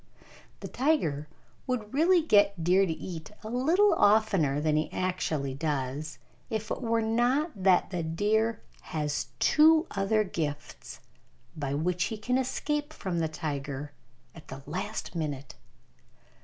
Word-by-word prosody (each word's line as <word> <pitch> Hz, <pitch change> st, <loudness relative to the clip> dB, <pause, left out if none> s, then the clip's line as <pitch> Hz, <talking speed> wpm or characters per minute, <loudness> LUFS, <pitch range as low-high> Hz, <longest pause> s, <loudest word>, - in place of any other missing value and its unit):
The -, -, -5 dB
tiger 200 Hz, -, 0 dB, 0.4 s
would 235 Hz, -4 st, -3 dB
really 335 Hz, +4 st, +4 dB
get 200 Hz, -, +3 dB
deer 185 Hz, +3 st, +4 dB
to -, -, -1 dB
eat 160 Hz, -1 st, -6 dB
a 215 Hz, -, -6 dB
little 330 Hz, -, +3 dB
oftener 205 Hz, -, +3 dB
than 155 Hz, 0 st, +1 dB
he 155 Hz, +1 st, 0 dB
actually 165 Hz, -7 st, -2 dB
does 145 Hz, 0 st, -3 dB, 0.3 s
if 220 Hz, -1 st, -3 dB
it -, -, -3 dB
were 230 Hz, -2 st, +1 dB
not 245 Hz, +8 st, +1 dB
that 190 Hz, -1 st, +3 dB
the 180 Hz, -2 st, -2 dB
deer 210 Hz, +7 st, 0 dB, 0.4 s
has 150 Hz, -1 st, -1 dB
two 315 Hz, +2 st, +5 dB
other 205 Hz, +2 st, +1 dB
gifts 155 Hz, -6 st, -5 dB, 0.5 s
by 140 Hz, -2 st, -3 dB
which 175 Hz, +4 st, 0 dB
he 220 Hz, -, -4 dB
can 250 Hz, +5 st, 0 dB
escape 295 Hz, +3 st, -2 dB
from 180 Hz, -3 st, -3 dB
the 160 Hz, -, +1 dB
tiger 145 Hz, -2 st, -5 dB, 0.4 s
at 155 Hz, -2 st, -14 dB
the 135 Hz, +1 st, -9 dB
last 185 Hz, +9 st, -4 dB
minute. 145 Hz, -5 st, -4 dB
185 Hz, 140 wpm, -28 LUFS, 150-230 Hz, 0.5 s, two